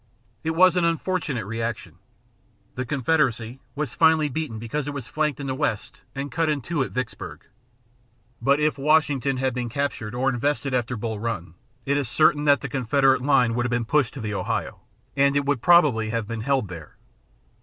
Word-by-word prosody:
It 160 0 -1
was 185 +1 +6
an 180 - +2
unfortunate 165 - -1
rejection. 110 -6 -4 0.7
The 125 0 -4
Confederacy 130 -4 0 0.2
was 145 -3 -3
finally 160 -2 +4
beaten 140 -4 -4
because 125 +6 -4
it 145 - -4
was 135 -4 -6
flanked 155 -3 -1
in 140 - -5
the 135 - -2
west 130 -6 -3
and 140 0 -4
cut 165 +4 0
in 150 -2 0
two 165 +4 -2
at 130 - -1
Vicksburg. 125 -2 -5 1.0
But 140 +4 +3
if 150 -1 +1
Washington 145 -2 +2
had 130 -1 0
been 120 -1 -3
captured 120 -4 -3
or 130 +2 0
invested 135 +2 0
after 125 -1 -1
Bull 110 -1 -4
Run, 105 -7 -4 0.3
it 140 +1 +1
is 140 -5 -1
certain 150 +2 +3
that 145 -3 +4
the - - -4
Confederate 135 +1 +2
line 130 -4 +3
would 120 +1 0
have - - -4
been 120 -1 0
pushed 140 0 +1
to 135 - -6
the 105 -1 -3
Ohio, 100 - -3 0.4
and 140 0 +3
it 140 -1 +1
would 140 -4 0
probably 145 -11 +4
have 115 -2 -2
been 115 0 -4
held 130 -2 0
there. 85 -4 -10
135 Hz, 190 wpm, -24 LUFS, 115-150 Hz, 1.0 s, was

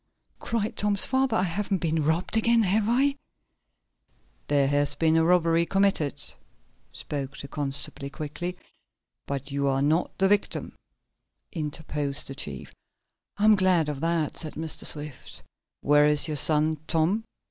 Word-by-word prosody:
cried 225 -2 -2
Tom's 205 -1 +2
father. 260 -3 +1
"I 185 - +1
haven't 195 +2 -1
been 160 -2 -1
robbed 160 +7 0
again, 230 +1 +3
have 205 +2 +2
I?' 275 +4 +2 1.3
"There 140 -2 +2
has 145 0 +1
been 160 0 +2
a 165 - +4
robbery 170 -1 +3
committed," 195 -7 +1 0.8
spoke 140 -2 -6
the 140 - -7
constable 140 -1 -2
quickly. 165 +5 -5 0.7
"But 140 0 -4
you 140 0 -1
are 135 0 +1
not 155 +4 0
the 195 - +3
victim," 205 0 0 0.8
interposed 150 -3 -2
the 135 - -6
chief. 75 - -7 0.6
"I'm 215 +1 +5
glad 185 -5 +2
of 145 -2 -4
that," 165 -1 -1
said 155 -2 -8
Mr. 160 0 -4
Swift. 145 -3 -5 0.4
"Where 145 0 +4
is 150 +1 +5
your 150 -1 -2
son, 155 +1 +3
Tom?" 170 +7 +1
160 Hz, 140 wpm, -26 LUFS, 145-190 Hz, 1.3 s, I'm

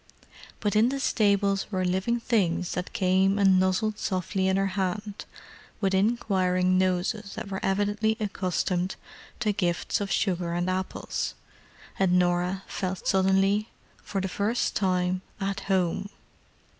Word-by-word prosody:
But 210 0 0
in 220 +3 +5
the 275 +1 -2
stables 200 -5 +1
were 185 -2 0
living 190 +7 0
things 190 -7 0
that 180 - -4
came 190 +1 +2
and 195 -2 +5
nuzzled 190 +3 +1
softly 190 0 -1
in 190 0 +2
her 195 - +2
hand 205 +2 -3 0.5
with 195 -3 +1
inquiring 190 -3 +2
noses 185 +3 0
that - - -6
were 190 - -2
evidently 205 +3 +1
accustomed 185 -3 -1 0.5
to 215 -3 +2
gifts 175 +2 -1
of 200 - -2
sugar 175 -4 0
and 175 +1 0
apples, 185 0 -3 0.6
and 190 -2 +3
Norah 180 +1 +1
felt 185 -2 -4
suddenly, 195 +2 +2 0.3
for 195 - -3
the 190 - -1
first 205 +5 -1
time, 185 -1 +1 0.2
at 195 0 -2
home. 190 +1 +1
190 Hz, 135 wpm, -27 LUFS, 185-205 Hz, 0.6 s, in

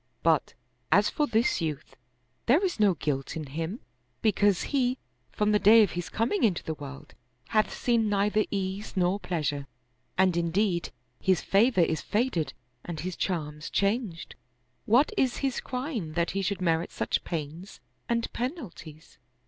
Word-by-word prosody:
But, - - +2 0.4
as - - +4
for 300 -2 +1
this 225 -5 +2
youth, 155 -4 -4 0.5
there 310 - +5
is 355 -10 -2
no 200 -4 +4
guilt 135 -3 -2
in 160 -2 -4
him, 165 - -4 0.4
because 205 -3 +3
he, 255 -2 +1 0.3
from 210 0 +1
the 210 - +4
day 220 +2 +8
of 200 - 0
his 175 -1 -4
coming 235 - 0
into 200 -7 +2
the 160 - -3
world, 140 -2 -10 0.4
hath 215 -1 +2
seen 230 -3 +1
neither 205 +1 +2
ease 195 +1 -3
nor 185 +2 +2
pleasure, 145 -7 -2 0.5
and 185 -2 +4
indeed 170 +1 +1 0.3
his 185 -2 +2
favor 205 0 +3
is 160 -1 +1
faded 205 - 0 0.3
and 165 -3 -5
his 180 +1 -4
charms 150 -4 -3
changed. 200 -4 -1 0.5
What 250 - +4
is 260 -7 +2
his 265 - 0
crime 250 - -4
that 170 +1 0
he 195 - -1
should 195 0 -2
merit 165 -1 +1
such - - -1
pains 165 +4 -6 0.3
and 235 -1 -1
penalties? 230 - -6
195 Hz, 155 wpm, -28 LUFS, 165-225 Hz, 0.5 s, day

